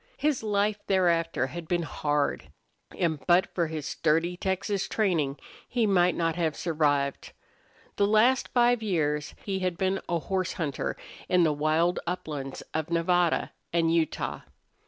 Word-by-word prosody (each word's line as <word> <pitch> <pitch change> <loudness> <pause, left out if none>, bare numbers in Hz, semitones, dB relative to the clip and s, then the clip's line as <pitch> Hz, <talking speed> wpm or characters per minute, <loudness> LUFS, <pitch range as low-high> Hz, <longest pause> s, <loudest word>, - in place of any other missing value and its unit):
His 295 -3 +1
life 210 -1 0
thereafter 170 -7 +2
had 165 +5 -7
been 175 0 0
hard, 145 -2 -1 0.5
and 160 -5 0
but 175 +1 +4
for 170 -2 0
his 155 -2 -5
sturdy 165 +4 +1
Texas 190 +2 -1
training 165 -10 0 0.3
he 240 -2 +1
might 180 -3 +3
not 165 -1 0
have 160 -3 0
survived. 145 -4 0 0.6
The 200 - +3
last 230 +5 +4
five 240 -1 +3
years 150 -8 -1
he 195 -2 -1
had 185 -2 -1
been 190 +1 0
a 170 - +1
horse 185 +2 -2
hunter 150 -5 -3 0.3
in 180 -1 +4
the 155 -2 +3
wild 155 +4 +1
uplands 150 -6 -4
of 160 +1 -2
Nevada 170 0 +1 0.2
and 165 -1 +2
Utah. 165 -2 -1
170 Hz, 145 wpm, -27 LUFS, 155-190 Hz, 0.6 s, but